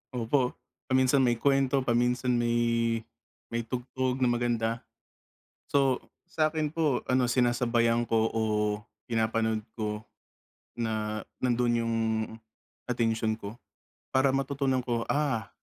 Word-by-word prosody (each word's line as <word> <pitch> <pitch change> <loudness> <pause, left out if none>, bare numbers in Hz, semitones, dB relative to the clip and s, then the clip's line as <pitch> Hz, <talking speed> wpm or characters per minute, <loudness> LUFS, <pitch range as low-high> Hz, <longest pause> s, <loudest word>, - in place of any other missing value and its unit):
Opo, 125 +2 +1 0.3
paminsan 130 +1 +4
may 120 -1 +3
kwento, 135 0 +2
paminsan 125 +1 +1
may 115 -1 +1 0.5
may 115 0 -1
tugtog 125 +2 -2
na 130 - +3
maganda. 120 -1 0 0.9
So, 135 -3 +2 0.2
sa'kin 155 -2 0
po 150 -6 +1
ano 125 -1 +3
sinasabayan 120 -1 +2
ko 115 -1 +2
o 115 - -1 0.7
pinapanood 110 -1 0
ko 105 -1 -3 0.7
na 110 -2 -2 0.2
nandun 120 -1 +2
yung 115 0 -1 0.9
atensyon 115 -2 0
ko. 100 +1 -7 0.6
Para 130 +1 +4
matutunan 135 -1 0
ko 120 -2 0
ah, 140 -7 0
120 Hz, 105 wpm, -29 LUFS, 115-130 Hz, 0.9 s, paminsan